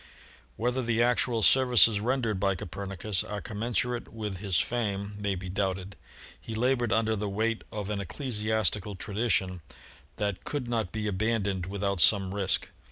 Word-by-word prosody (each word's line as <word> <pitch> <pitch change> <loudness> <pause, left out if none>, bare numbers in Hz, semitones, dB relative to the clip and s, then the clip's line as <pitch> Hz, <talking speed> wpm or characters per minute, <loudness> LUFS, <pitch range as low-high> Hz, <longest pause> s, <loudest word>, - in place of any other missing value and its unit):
Whether 125 +3 0
the 120 -1 +2
actual 120 -1 +2
services 125 -4 +6
rendered 115 -3 0
by 100 0 +2
Copernicus 95 +3 -3
are 105 - -5
commensurate 120 +3 -2
with 105 -4 -5
his 95 -3 0
fame 100 -1 -1
may 100 -1 0
be 95 0 -6
doubted. 95 0 -2 0.5
He 115 - -6
labored 120 0 +1
under 110 -1 +2
the 105 0 -2
weight 110 +3 -1
of 105 -2 -4
an 100 -1 -2
ecclesiastical 105 - -1
tradition 95 -2 -1 0.5
that 100 -3 -2
could 145 -4 -3
not 115 -5 -1
be 110 -1 -3
abandoned 100 -2 0
without 100 -2 -1
some 95 -1 +5
risk. 100 -2 0
105 Hz, 150 wpm, -29 LUFS, 100-115 Hz, 0.5 s, services